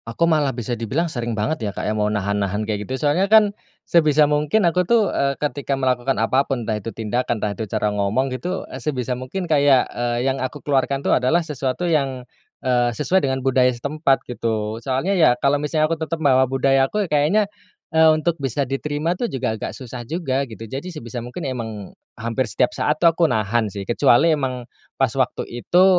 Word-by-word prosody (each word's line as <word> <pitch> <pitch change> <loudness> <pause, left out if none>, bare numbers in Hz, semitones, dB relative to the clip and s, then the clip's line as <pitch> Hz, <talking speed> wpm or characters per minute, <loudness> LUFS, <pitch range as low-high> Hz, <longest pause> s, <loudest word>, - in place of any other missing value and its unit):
Aku - - 0
malah 150 -6 +2
bisa 120 -1 -5
dibilang 150 +9 -1
sering 120 -3 -3
banget 110 +9 -1
ya - - -2
Kak - - -4
ya - - 0
mau 105 -1 0
nahan-nahan 100 0 -1
kayak 105 -1 -3
gitu 130 - -3
soalnya 150 +8 +1
kan 215 -1 +6 0.3
sebisa 155 -3 +4
mungkin 150 +7 +2
aku 180 +1 +2
tuh, 220 -3 +3
eee, 140 0 0
ketika 145 -1 -2
melakukan 130 0 0
apa 130 +5 +1
pun 130 -4 -2
entah 110 -1 -2
itu 110 +2 -7
tindakan 115 0 -2
entah 105 - 0
itu 110 +2 -5
cara 105 0 -1
ngomong 105 +6 0
gitu, 180 +9 -3
eee, - - -6
sebisa 125 -4 -2
mungkin 170 +7 -5
kayak, 140 -3 +4
eee, 120 0 -2
yang 135 - -4
aku 130 +3 -5
keluarkan 140 -1 0
tuh - - +1
adalah 130 +8 +3
sesuatu 140 -1 -3
yang, 135 -5 0 0.4
eee, 125 -1 +2
sesuai 175 - +2
dengan 130 -4 -1
budaya 130 -1 +3
setempat 140 +2 0
gitu 110 -2 -2
soalnya 130 +9 -1
ya, 165 -10 +4
kalau 145 +1 +3
misalnya 155 +1 0
aku 165 - -1
tetap 160 +1 -3
bawa 130 -2 +5
budaya 135 +1 +2
aku 210 0 0
kayaknya, 150 +9 +3 0.5
eee, 160 0 +7
untuk 155 +2 +1
bisa 135 +2 0
diterima 145 +4 -2
tuh 240 +6 -2
juga 115 -4 -2
agak - - -4
susah 125 -1 -8
juga 140 -4 -1
gitu 115 -1 -9
jadi 135 +10 -6
sebisa 120 -6 -7
mungkin 125 +7 -6
emang 110 -6 -5 0.3
hampir 115 +3 -1
setiap 125 - +1
saat 150 +1 0
tuh 170 - +5
aku 170 - 0
nahan 110 0 0
sih 100 0 -6
kecuali 120 +7 +4
emang 130 -4 -3 0.3
pas - - +2
waktu - - 0
itu 175 +10 +2
135 Hz, 200 wpm, -21 LUFS, 120-155 Hz, 0.5 s, eee